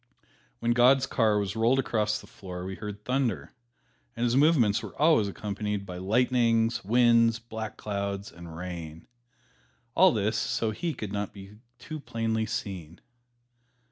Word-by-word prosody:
When 120 Hz, -, 0 dB
God's 125 Hz, +3 st, +5 dB
car 110 Hz, -4 st, +2 dB
was 100 Hz, 0 st, -2 dB
rolled 115 Hz, +4 st, +3 dB
across 110 Hz, -5 st, 0 dB
the -, -, -13 dB
floor 90 Hz, -2 st, -8 dB
we 95 Hz, -, -4 dB
heard 105 Hz, +1 st, -8 dB
thunder, 125 Hz, -5 st, -1 dB, 0.6 s
and 120 Hz, -, -3 dB
his 120 Hz, 0 st, +2 dB
movements 135 Hz, -8 st, +4 dB
were -, -, -10 dB
always 150 Hz, -9 st, +4 dB
accompanied 105 Hz, 0 st, -4 dB
by 90 Hz, -2 st, -7 dB
lightnings, 115 Hz, +2 st, +2 dB
winds, 115 Hz, +1 st, +4 dB
black 110 Hz, -2 st, -7 dB
clouds 100 Hz, -1 st, -4 dB
and 85 Hz, -1 st, -10 dB
rain 85 Hz, -3 st, -7 dB, 0.9 s
all 185 Hz, +4 st, +6 dB
this 110 Hz, +1 st, 0 dB
so 110 Hz, 0 st, 0 dB
He 165 Hz, +9 st, -3 dB
could 105 Hz, -2 st, -6 dB
not 100 Hz, -1 st, -3 dB
be 100 Hz, +1 st, -12 dB, 0.2 s
too 155 Hz, +5 st, -7 dB
plainly 115 Hz, -4 st, -2 dB
seen. 90 Hz, -6 st, -5 dB
110 Hz, 145 wpm, -28 LUFS, 100-120 Hz, 0.9 s, all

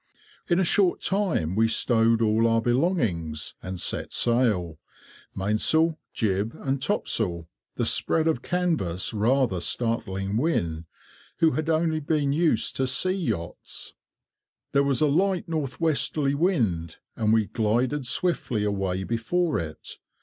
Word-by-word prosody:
In 175 Hz, -1 st, +2 dB
a -, -, +3 dB
short 185 Hz, +1 st, +2 dB
time 185 Hz, -, 0 dB
we 110 Hz, +1 st, +3 dB
stowed 115 Hz, 0 st, +3 dB
all 110 Hz, +1 st, +3 dB
our 115 Hz, 0 st, +3 dB
belongings, 115 Hz, -, -1 dB
and 95 Hz, -1 st, -6 dB
set -, -, -2 dB
sail—mainsail, 110 Hz, -, 0 dB
jib, 105 Hz, 0 st, -1 dB
and 135 Hz, 0 st, -2 dB
topsail—the 90 Hz, -, -2 dB
spread 160 Hz, -1 st, +2 dB
of 160 Hz, -7 st, +1 dB
canvas 160 Hz, -, -1 dB
rather 115 Hz, -2 st, +1 dB
startling 100 Hz, -2 st, -2 dB
Wynne, 85 Hz, -, -1 dB, 0.5 s
who 165 Hz, -1 st, +4 dB
had 155 Hz, +1 st, -2 dB
only 160 Hz, 0 st, +1 dB
been 145 Hz, -2 st, 0 dB
used 155 Hz, -7 st, +1 dB
to 130 Hz, -, +1 dB
sea 185 Hz, +8 st, +1 dB
yachts. 115 Hz, -, -4 dB, 0.8 s
There 140 Hz, -, +3 dB
was 140 Hz, 0 st, +1 dB
a 155 Hz, -, +4 dB
light 185 Hz, +5 st, +1 dB
north 150 Hz, -6 st, -3 dB
westerly 140 Hz, -2 st, 0 dB
wind, 115 Hz, -, 0 dB, 0.2 s
and 110 Hz, -2 st, +1 dB
we 110 Hz, -1 st, +3 dB
glided 120 Hz, +6 st, 0 dB
swiftly 135 Hz, -, 0 dB
away 95 Hz, -2 st, -1 dB
before 135 Hz, -, 0 dB
it. 80 Hz, -2 st, -7 dB
120 Hz, 130 wpm, -25 LUFS, 100-160 Hz, 0.8 s, who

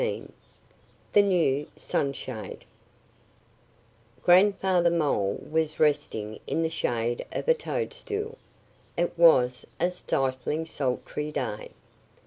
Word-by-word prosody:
XIV -, -, -3 dB, 0.8 s
THE 205 Hz, -, +7 dB
NEW 165 Hz, -8 st, +2 dB
SUNSHADE 130 Hz, -5 st, -3 dB, 1.6 s
GRANDFATHER 185 Hz, -1 st, +4 dB
MOLE 145 Hz, -12 st, 0 dB
was 155 Hz, 0 st, -1 dB
resting 140 Hz, -8 st, 0 dB
in 165 Hz, -, 0 dB
the 160 Hz, -, -1 dB
shade 120 Hz, -5 st, -1 dB
of -, -, -4 dB
a 485 Hz, -, +7 dB
toadstool. 465 Hz, -1 st, -4 dB, 0.6 s
It 175 Hz, +1 st, 0 dB
was 130 Hz, -7 st, +5 dB, 0.2 s
a 180 Hz, -, +2 dB
stifling, 135 Hz, -2 st, -1 dB
sultry 150 Hz, +1 st, -3 dB
day. 115 Hz, -7 st, -4 dB
160 Hz, 100 wpm, -27 LUFS, 130-180 Hz, 1.6 s, THE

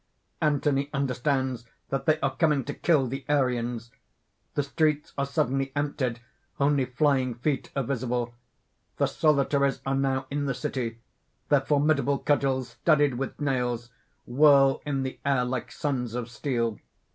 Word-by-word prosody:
Anthony 145 Hz, -2 st, +1 dB
understands 130 Hz, -2 st, -1 dB, 0.2 s
that 135 Hz, 0 st, -2 dB
they 155 Hz, 0 st, +4 dB
are 135 Hz, -1 st, 0 dB
coming 150 Hz, -2 st, +2 dB
to 145 Hz, -, -5 dB
kill 155 Hz, -6 st, +2 dB
the 135 Hz, +2 st, -4 dB
Arians. 120 Hz, -4 st, 0 dB, 0.6 s
The 145 Hz, -, +1 dB
streets 150 Hz, +1 st, 0 dB
are 140 Hz, 0 st, -1 dB
suddenly 135 Hz, -2 st, 0 dB
emptied 140 Hz, -5 st, -1 dB, 0.4 s
only 140 Hz, -1 st, +3 dB
flying 130 Hz, -1 st, +1 dB
feet 135 Hz, +3 st, -2 dB
are 135 Hz, -, +1 dB
visible. 125 Hz, -2 st, -2 dB, 0.6 s
_The -, -, +2 dB
Solitaries 140 Hz, -2 st, +2 dB
are 135 Hz, -, 0 dB
now 135 Hz, -1 st, 0 dB
in 145 Hz, 0 st, -1 dB
the 135 Hz, -, -1 dB
city. 125 Hz, -6 st, -3 dB, 0.5 s
Their -, -, +5 dB
formidable 145 Hz, -1 st, +2 dB
cudgels, 135 Hz, -3 st, +1 dB
studded 145 Hz, 0 st, +2 dB
with 135 Hz, -, -4 dB
nails, 125 Hz, -4 st, -1 dB, 0.3 s
whirl 135 Hz, +1 st, +5 dB
in 135 Hz, -2 st, 0 dB
the 130 Hz, -, -5 dB
air 135 Hz, -3 st, +2 dB
like 125 Hz, 0 st, -3 dB
suns 125 Hz, -5 st, -2 dB
of 120 Hz, -1 st, -4 dB
steel. 115 Hz, -2 st, -1 dB
135 Hz, 145 wpm, -27 LUFS, 125-145 Hz, 0.6 s, Their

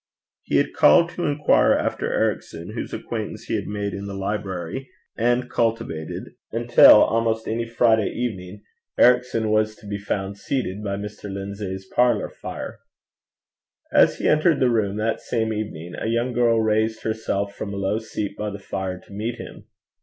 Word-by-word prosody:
He -, -, 0 dB
had -, -, +1 dB
called 170 Hz, -, +6 dB
to 175 Hz, -1 st, -2 dB
inquire 145 Hz, 0 st, +3 dB
after -, -, -1 dB
Ericson, -, -, -2 dB
whose -, -, -5 dB
acquaintance -, -, -5 dB
he -, -, -5 dB
had -, -, -3 dB
made 100 Hz, -1 st, -3 dB
in 100 Hz, +1 st, -5 dB
the 100 Hz, -, -6 dB
library, 95 Hz, +3 st, -4 dB, 0.3 s
and 120 Hz, +2 st, +1 dB
cultivated 115 Hz, -11 st, -2 dB, 0.2 s
until 120 Hz, -2 st, +7 dB
almost 115 Hz, 0 st, 0 dB
any 115 Hz, +1 st, -2 dB
Friday 115 Hz, -2 st, +3 dB
evening 100 Hz, -4 st, -5 dB, 0.3 s
Ericson 125 Hz, -3 st, +3 dB
was 110 Hz, 0 st, +2 dB
to 105 Hz, -, -18 dB
be 100 Hz, 0 st, -4 dB
found 100 Hz, 0 st, -3 dB
seated 105 Hz, -5 st, -3 dB
by 100 Hz, -1 st, -2 dB
Mr. 105 Hz, 0 st, -7 dB
Lindsay's 95 Hz, -1 st, -5 dB
parlour 120 Hz, +1 st, +2 dB
fire. 110 Hz, -, -7 dB, 1.1 s
As -, -, +5 dB
he -, -, -1 dB
entered 155 Hz, 0 st, +3 dB
the 130 Hz, -2 st, +3 dB
room 105 Hz, -3 st, 0 dB
that 110 Hz, +1 st, -1 dB
same 110 Hz, -2 st, -1 dB
evening, 90 Hz, -6 st, -5 dB
a -, -, -4 dB
young 115 Hz, +2 st, 0 dB
girl 120 Hz, -1 st, +3 dB
raised 110 Hz, 0 st, +1 dB
herself 100 Hz, -2 st, -2 dB
from 100 Hz, -, -5 dB
a 100 Hz, -, -5 dB
low 100 Hz, +2 st, 0 dB
seat 105 Hz, -2 st, -5 dB
by 105 Hz, 0 st, -3 dB
the 100 Hz, -, -6 dB
fire 95 Hz, -2 st, -4 dB
to -, -, -14 dB
meet 110 Hz, +4 st, -3 dB
him. 120 Hz, -, -10 dB
110 Hz, 170 wpm, -23 LUFS, 100-115 Hz, 1.1 s, until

